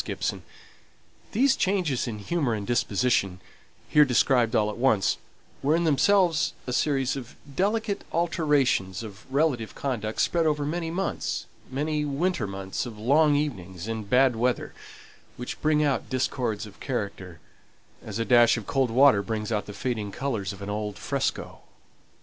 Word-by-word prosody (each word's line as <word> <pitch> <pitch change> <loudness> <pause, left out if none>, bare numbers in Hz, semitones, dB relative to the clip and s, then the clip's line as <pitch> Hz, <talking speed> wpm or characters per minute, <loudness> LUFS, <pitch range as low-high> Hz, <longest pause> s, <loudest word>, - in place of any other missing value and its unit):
These 265 +5 +3
changes 180 -11 0
in 110 -3 -4
humour 125 +2 -1
and 105 -2 -5
disposition, 110 -4 +1 0.5
here 150 - +6
described 125 -3 +3
all 105 0 +2
at - - -9
once, 120 -6 +2 0.4
were 145 +3 +3
in 170 - +1
themselves 165 +1 +3
a 125 - -3
series 135 -1 +1
of 130 -3 -8 0.2
delicate 210 +2 0
alterations 145 - +1
of 110 +3 -11
relative 135 -6 0
conduct 110 -6 -3
spread 165 -2 +2
over 150 -1 0
many 165 +2 -2
months 190 +4 -2 0.2
many 150 +3 -1
winter 145 - -1
months 95 +4 -4
of 110 -3 -9
long 145 +7 +4
evenings 95 - -3
and 110 -3 -4
bad 130 -1 +4
weather, 120 +2 -1 0.6
which 125 - -6
bring 150 0 +3
out 140 -2 0
discords 125 -4 -1
of 105 - -14
character, 100 - -4 0.6
as 110 -2 -5
a 115 - -1
dash 120 -1 +5
of 110 - -6
cold 135 +1 +1
water 125 -3 +5
brings 105 +1 -3
out 105 -2 -1
the - - -6
fading 110 -2 -3
colours 115 -5 -3
of 100 0 -9
an 100 - -5
old 105 -1 -3
fresco. - - -2
125 Hz, 150 wpm, -26 LUFS, 105-150 Hz, 0.6 s, here